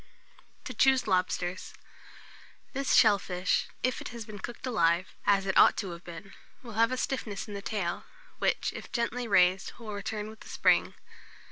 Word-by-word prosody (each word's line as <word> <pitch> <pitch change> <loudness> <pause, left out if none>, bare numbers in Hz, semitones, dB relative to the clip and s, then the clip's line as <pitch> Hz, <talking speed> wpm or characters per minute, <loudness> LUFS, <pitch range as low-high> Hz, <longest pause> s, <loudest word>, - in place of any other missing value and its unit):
TO - - -5
CHOOSE 265 -2 +3
LOBSTERS. 185 -1 -1 1.0
This 275 0 +1
shell 210 -3 +6
fish, 180 -1 -1 0.2
if 255 -1 0
it - - -6
has 235 -2 -7
been 210 -2 -9
cooked 240 +5 -7
alive, 175 -7 +1
as 200 -1 +4
it 190 - -1
ought - - +6
to 190 - -3
have 170 0 -9
been, 175 +3 -10 0.3
will 235 -3 -9
have 230 +2 +3
a 255 - -1
stiffness 230 -7 -3
in 210 - -8
the 200 - -5
tail, 195 -4 -3 0.3
which, - - 0
if - - -9
gently 240 0 -2
raised, 185 -2 +3
will 220 -3 -7
return 210 +1 -4
with 220 0 -12
a - - -13
spring. - - +2
205 Hz, 175 wpm, -29 LUFS, 185-235 Hz, 1.0 s, shell